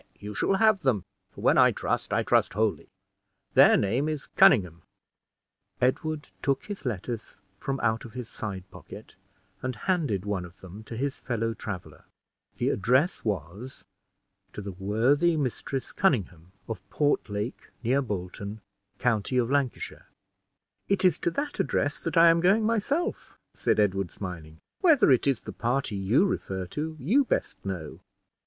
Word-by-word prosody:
"Nay, - - -33
you 105 +1 -7
shall 195 - +1
have 215 0 +4
them; 125 - 0 0.2
for - - -12
when - - +4
I - - +7
trust, - - -2
I - - +2
trust - - +2
wholly. 110 -1 0 0.7
Their - - +7
name 125 +10 +1
is 155 -3 -4
Conynghame." 90 - +5 1.0
Edward 150 +4 0
took 135 -1 0
his 205 -9 -6
letters 115 +1 -4 0.2
from 135 0 -3
out 110 -1 +1
of 115 - -11
his 125 -2 -6
side 95 -6 -6
pocket, 110 - -12 0.5
and 130 -1 -3
handed 135 - -1
one 100 -3 -2
of 90 0 -13
them 95 +3 -10
to 115 - -7
his 140 +2 -2
fellow 115 -2 -2
traveler. 100 -5 -7 0.5
The - - +1
address 130 - +2
was, 100 - -4 0.7
"To - - -6
the 100 - -5
worthy 120 - +2
Mistress 135 -1 -3
Conynghame, 95 - 0 0.2
of 95 - -5
Portlake, 110 -5 -1
near 130 +4 +2
Bolton, 100 -1 -5 0.4
county 120 +1 0
of 125 0 +1
Lancashire." 140 -3 -2 0.8
"It 195 -1 +2
is 180 -4 +4
to - - +1
that 285 - -4
address 145 +1 0
that 165 -1 -2
I 165 0 +8
am 165 0 +4
going 195 +5 +4
myself," 230 +9 -1 0.2
said - - +1
Edward, 95 -3 +1
smiling. 80 -4 -8 0.2
"Whether 315 - +5
it 130 +2 +3
is 135 -4 +1
the - - -8
party 120 -2 -1
you 100 - +3
refer 95 - -2
to, 155 - -4
you 205 - +3
best - - -2
know." 90 -6 -5
120 Hz, 155 wpm, -27 LUFS, 100-150 Hz, 1.0 s, I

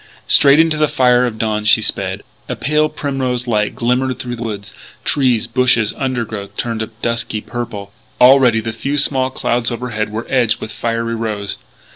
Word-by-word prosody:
Straight 140 0 +5
into 160 -1 +3
the 155 0 +3
fire 125 -2 +3
of 110 -2 -5
dawn 110 -1 -1
she 105 - +5
sped. - - -2 0.3
A - - -2
pale 150 +1 +1
primrose 130 -4 -2
light 105 -3 0
glimmered 125 +1 0
through 120 -1 -5
the 115 - -10
woods; 105 -2 -5 0.3
trees, 125 -5 +2
bushes, 120 -2 +2
undergrowth 115 -7 -4
turned 115 -2 -2
a 110 - -2 0.2
dusky 115 -2 -1
purple. 105 -4 -6 0.3
Already 125 -3 +6
the 115 0 -4
few 140 +6 -3
small 130 -2 +2
clouds 120 -2 -1
overhead 115 -3 -3
were 110 +2 -4
edged 125 -5 +1
with - - -7
fiery 115 0 -2
rose. 110 -3 -3
120 Hz, 170 wpm, -17 LUFS, 110-130 Hz, 0.3 s, Already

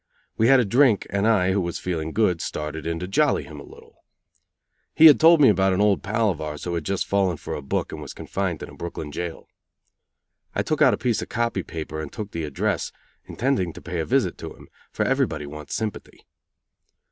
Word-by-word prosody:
We 110 - +2
had 135 +1 +6
a 125 - +2
drink, 120 0 +3
and 100 +2 +1
I, 95 -5 +3
who 100 +1 +1
was 85 -1 -3
feeling 80 -3 -3
good, 90 -4 +1
started 75 +1 -5
in 85 0 -2
to 90 - -4
jolly 145 +8 +2
him 75 -2 -10
a - - -9
little. - - -17 0.9
He 160 - +7
had 155 - +9
told 165 0 +7
me 140 - +7
about 95 -2 +3
an 95 - 0
old 105 -1 +3
pal 105 +2 +1
of 80 - -6
ours 75 -1 -5
who 90 - -3
had 85 - -3
just 100 -1 -1
fallen 95 -4 +1
for - - -6
a - - -4
book 70 - -2
and 75 - -7
was 75 - -8
confined 95 -5 -3
in - - -8
a - - -13
Brooklyn 80 -3 -6
jail. 85 +1 -6 1.1
I - - +1
took - - -2
out - - +6
a - - -14
piece 120 -3 0
of - - -7
"copy" 115 -4 -1
paper 80 -2 -6
and 75 - -7
took 105 -1 -6
the 85 -2 -3
address, 75 -3 -2 0.3
intending 120 - -1
to - - -10
pay 90 -1 -4
a 80 - -1
visit - - 0
to - - -8
him, - - -16 0.2
for - - -1
everybody 75 -1 0
wants 75 +1 -7
sympathy. 110 -2 -5
90 Hz, 225 wpm, -24 LUFS, 80-110 Hz, 1.1 s, had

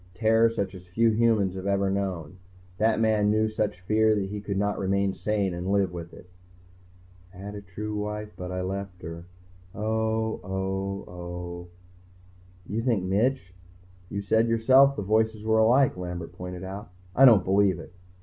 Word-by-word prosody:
Terror 115 +2 +4
such 100 -4 -3
as 90 -2 -12
few 115 +6 +2
humans 110 -4 +2
have 95 +1 -5
ever 100 -1 +1
known. 95 -4 -3 0.4
That 110 0 +2
man 110 -2 +3
knew 110 +1 +2
such 105 -3 -2
fear 110 +3 +3
he 100 +1 -3
could 100 -1 -3
not 105 +1 0
remain 100 0 +1
sane 100 -3 -1
and 90 +2 -3
live 100 -2 +2
with 85 -1 -7
it." - - -14 1.0
I 95 - -16
had 100 +2 -7
a 105 - -7
true 105 +2 -6
wife 105 0 -4
but 90 0 -6
I 90 0 -3
left 95 -1 -5
her... 85 +1 -7 0.5
oh, 110 +1 -1
oh, 95 +1 -3
oh. 90 0 -7 1.0
"You 105 +5 -2
think 115 -6 +1
Mitch 100 +1 0 0.3
" 90 0 -27
"You 100 - -3
said 110 +3 +2
yourself 130 +5 +5
the 105 - -3
voices 110 +1 +1
were 110 0 +3
alike." 125 +5 +4
Lambert 90 -2 -6
pointed 90 +1 -7
out. 95 +1 -7 0.3
"I 135 - +7
don't 110 -8 +7
believe 95 -1 +3
it." 85 +1 -11
100 Hz, 170 wpm, -26 LUFS, 90-110 Hz, 1.0 s, I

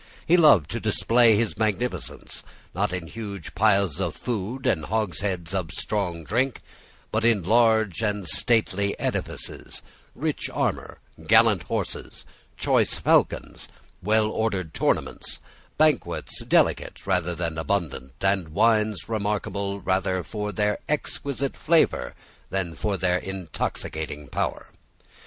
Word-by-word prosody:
He 170 - +5
loved 145 - +6
to - - -2
display 115 -1 +4
his 110 +1 -1
magnificence, 110 +3 -2 0.3
not - - 0
in 90 -2 -3
huge 100 -2 -7
piles 100 -5 +3
of 85 -4 -2
food 120 +2 -4
and 80 - +1
hogsheads 95 -3 -2
of 95 -4 -1
strong 90 -4 -2
drink, 125 - 0 0.5
but 110 +1 0
in 115 -5 +3
large 110 -2 +3
and 105 -4 -1
stately 100 -3 +2
edifices, - - -4 0.3
rich - - -2
armour, - - -2 0.3
gallant - - +6
horses, - - -4 0.3
choice - - +2
falcons, - - +1 0.3
well 110 +2 +2
ordered 95 -8 -1
tournaments, - - -1 0.4
banquets 155 0 +1
delicate - - +1
rather 90 -2 0
than 85 -1 -3
abundant, 80 -7 -2
and 95 -4 +1
wines 110 +4 +2
remarkable 100 -2 -2
rather 95 -1 0
for 105 +2 -4
their 105 0 0
exquisite 140 -2 -2
flavour 160 - +2 0.3
than 95 -4 -2
for 100 +3 -2
their 90 0 +1
intoxicating 80 -5 -4
power. - - -3
100 Hz, 120 wpm, -25 LUFS, 90-110 Hz, 0.5 s, loved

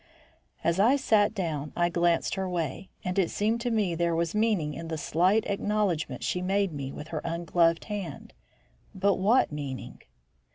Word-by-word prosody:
As 170 +2 +1
I 235 +7 +5
sat 220 -5 +2
down, 155 -6 -3
I 175 0 +2
glanced 170 -1 +1
her 190 -1 -2
way, 175 +1 -3
and 180 +2 -1
it 180 - +2
seemed 220 +3 0
to 245 - -1
me 210 -6 +1
there 170 0 0
was 165 0 0
meaning 210 -9 +1
in 165 +1 -6
the 160 -1 -3
slight 185 +8 +2
acknowledgment 200 -5 -1
she 180 - -1
made 195 -1 +1
me 135 -2 -5
with 150 +3 -8
her 155 -2 -3
ungloved 170 0 +1
hand. 205 -4 -6 0.6
But 195 0 +2
what 220 +4 +3
meaning? 140 -3 -6
180 Hz, 170 wpm, -28 LUFS, 165-205 Hz, 0.6 s, I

